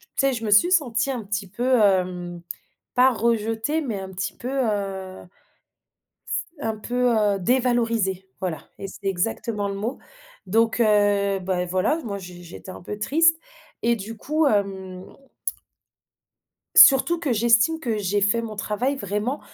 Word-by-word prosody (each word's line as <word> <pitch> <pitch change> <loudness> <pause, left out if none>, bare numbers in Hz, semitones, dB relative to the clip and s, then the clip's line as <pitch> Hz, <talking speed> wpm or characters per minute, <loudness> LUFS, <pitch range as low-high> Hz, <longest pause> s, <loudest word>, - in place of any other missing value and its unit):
tu 275 - +2
sais, 270 - +1
je 230 -2 -4
me 210 - -1
suis 210 - +5
sentie 265 -9 +1
un 245 -4 -4
petit 205 0 -3
peu, 245 +6 +1
hem, 180 -3 0 0.5
pas 255 +1 +6
rejetée, 225 +5 0
mais 230 -9 -3
un 190 0 -7
petit 190 +1 -4
peu, 245 - -6
heu 200 -7 -3 1.0
s - - -4 0.3
un 225 -5 -2
peu, 245 +3 0
heu, 205 -2 +2
dévalorisée, 230 -4 0
voilà. 175 -6 -4
Et - - -5
c'est 195 - -13
exactement 205 +2 -1
le 200 - -4
mot. 215 +6 -4 0.5
Donc 225 +4 +1
heu, 205 -2 +3
bah 185 -1 -1
voilà, 185 - 0
moi, 200 -3 -4
j'é 180 -2 -11
j'étais 175 +2 -11
un - - -10
peu 205 +3 -6
triste. 325 +9 +3 0.4
Et 235 0 +2
du 225 +2 -7
coup, 305 +7 0
hem 190 -4 -1 1.7
Surtout 310 +5 +7
que 295 -6 0
j'estime 235 +7 +3
que 235 -8 -2
j'ai 205 0 0
fait 205 +4 +2
mon 220 -2 -6
travail 230 +7 -1
vraiment, 210 +4 -3
215 Hz, 155 wpm, -23 LUFS, 195-245 Hz, 1.7 s, Surtout